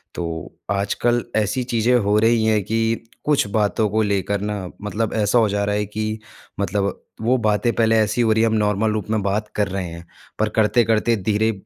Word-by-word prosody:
तो 85 -2 -5 0.2
आजकल 110 +4 0
ऐसी 110 +4 0
चीज़ें 120 0 +1
हो 105 -2 +2
रही 115 +1 +3
हैं 110 -1 +3
कि 115 +2 -1 0.2
कुछ 150 -5 +2
बातों 105 +1 +1
को 110 +2 +1
लेकर 100 -1 -1
न 105 -3 -4
मतलब 105 +1 -2
ऐसा 105 +1 +2
हो 110 -2 +3
जा 100 0 0
रहा 105 0 0
है 105 0 0
कि 110 +1 -4 0.4
मतलब 100 +1 -1 0.2
वो 125 +3 +2
बातें 110 +1 +1
पहले 115 -1 +3
ऐसी 110 +3 +1
हो 115 -2 +3
रही 110 +1 +3
है - - +4
हम 110 - -1
नॉर्मल 105 +1 +1
रूप 105 -1 -3
में 110 -1 +1
बात 105 +2 -1
कर 105 -1 +1
रहे 95 -1 -3
हैं, 85 0 -9 0.3
पर 110 0 +2
करते-करते 110 +1 +2
धीरे 110 +2 +1
110 Hz, 200 wpm, -21 LUFS, 100-115 Hz, 0.4 s, है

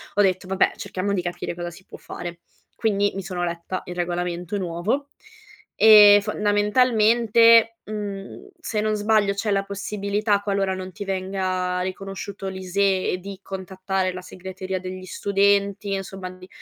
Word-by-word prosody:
ho 205 - +4
detto: 185 -1 +1
"Vabbè, 190 +1 +2
cerchiamo 200 0 -3
di 190 - 0
capire 175 -1 -4
cosa 175 0 -5
si 180 +3 -15
può - - -11
fare". 170 -1 -8 0.3
Quindi 205 -3 +1
mi 195 - -4
sono 180 -1 -4
letta 170 +2 -3
il 180 - -7
regolamento 175 +1 -2
nuovo 190 +10 -2 0.7
e, 210 -2 +9
fondamentalmente, 225 +2 +4
mhmm, 205 - -6
se 215 -10 -2
non 215 0 0
sbaglio 210 -1 +2
c'è 205 +2 -3
la 195 -1 +1
possibilità, 200 +1 -1
qualora 195 -2 0
non 185 0 -7
ti 200 +2 -7
venga 185 -1 -2
riconosciuto 195 +1 -5
l'ISEE, 190 0 0
di 195 +1 -9
contattare 190 0 -3
la 185 - -7
segreteria 185 +1 -6
degli 185 0 -7
studenti, 200 +1 +1
insomma, 195 -1 -5
di 185 0 -13
195 Hz, 145 wpm, -23 LUFS, 185-205 Hz, 0.7 s, e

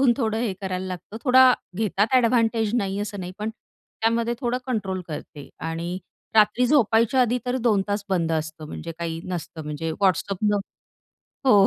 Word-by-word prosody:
सांगून 260 -3 +5
थोडं 220 -4 0
हे 225 -5 0
करायला 190 -1 -3
लागतं, 185 +3 -7
थोडा 255 0 +7 0.2
घेतात 210 -1 +1
अ‍ॅडव्हांटेज 230 -3 +3
नाही 200 -4 0
असं 205 -1 -4
नाही, 180 0 -6
पण 215 +1 -2
त्यामध्ये 230 +1 -2
थोडं 245 0 0
कंट्रोल 200 -7 -2
करते 150 -1 -8 0.2
आणि 170 +3 -3 0.4
रात्री 215 +3 +5
झोपायच्या 240 -2 +4
आधी 245 +1 +1
तर 250 +1 0
2 205 -4 +4
तास 205 0 -1
बंद 170 -4 +1
असतं. 155 0 -3
म्हणजे 165 +2 -6
काही 165 -1 -3
नसतं 170 -3 -5
म्हणजे 150 +2 -3
WhatsAppन 195 +2 +2 0.9
हो, 255 - +7
205 Hz, 160 wpm, -24 LUFS, 180-235 Hz, 0.9 s, थोडा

